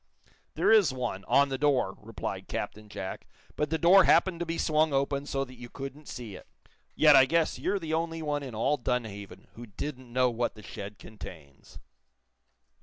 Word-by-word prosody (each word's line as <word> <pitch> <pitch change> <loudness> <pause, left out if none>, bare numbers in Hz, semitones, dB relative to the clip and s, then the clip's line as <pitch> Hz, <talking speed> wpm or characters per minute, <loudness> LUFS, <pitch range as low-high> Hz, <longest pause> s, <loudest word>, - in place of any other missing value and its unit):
"There - - +3
is 210 -10 +6
one, 120 -7 -4
on 140 0 +4
the 135 -1 -3
door," 135 -9 +2
replied 105 -4 -6
Captain 105 0 -5
Jack. 95 -2 -6 0.3
"But 150 - -1
the 160 - 0
door 175 +4 +6
happened 170 0 +4
to 175 - -3
be 165 0 -2
swung 155 -1 +2
open, 140 +1 0
so 135 -1 -1
that 130 - -13
you 120 -1 -9
couldn't 140 +3 -8
see 115 -5 -7
it. - - -13 0.5
Yet - - +7
I 130 - +8
guess 165 +3 +1
you're 200 - 0
the 160 -4 -4
only 165 0 -2
one 145 -1 -1
in 130 -5 -7
all 140 +7 +1
Dunhaven 100 -8 -4
who 120 +1 -10
didn't 130 +3 -7
know 125 0 +2
what 120 0 -2
the 105 - -13
shed 100 +1 -8
contains." 80 -11 -12
135 Hz, 185 wpm, -29 LUFS, 110-155 Hz, 0.5 s, I